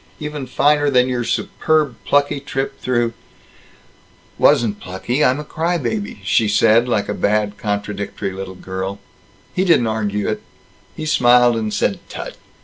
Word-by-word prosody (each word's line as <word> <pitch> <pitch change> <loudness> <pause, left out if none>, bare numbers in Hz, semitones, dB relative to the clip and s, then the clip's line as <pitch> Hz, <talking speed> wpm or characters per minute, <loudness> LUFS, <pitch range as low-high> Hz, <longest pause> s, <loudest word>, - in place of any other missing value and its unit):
Even 150 -3 -5
finer 145 +3 +3
than 125 -2 +4
your 125 -2 -1
superb 150 +2 0
plucky 145 0 +2
trip 135 -1 -4
through 120 -2 0 0.6
" - - -32
"Wasn't 105 -3 +4
plucky! 120 +10 -2
I'm 130 +3 +3
a - - -4
cry 165 +3 -1
baby," 205 - -4
she 105 +4 +2
said, 115 +3 +4
like 105 -4 0
a - - -2
bad, 105 0 0
contradictory 100 -1 -3
little 95 0 -7
girl. 95 +1 -5 0.6
He 185 - +1
didn't 165 -10 +4
argue 105 -2 -1
it. - - -2 0.5
He 155 - -5
smiled 125 -4 +5
and 110 -1 -2
said - - 0
"Tut!" - - -7
120 Hz, 150 wpm, -19 LUFS, 105-145 Hz, 0.6 s, smiled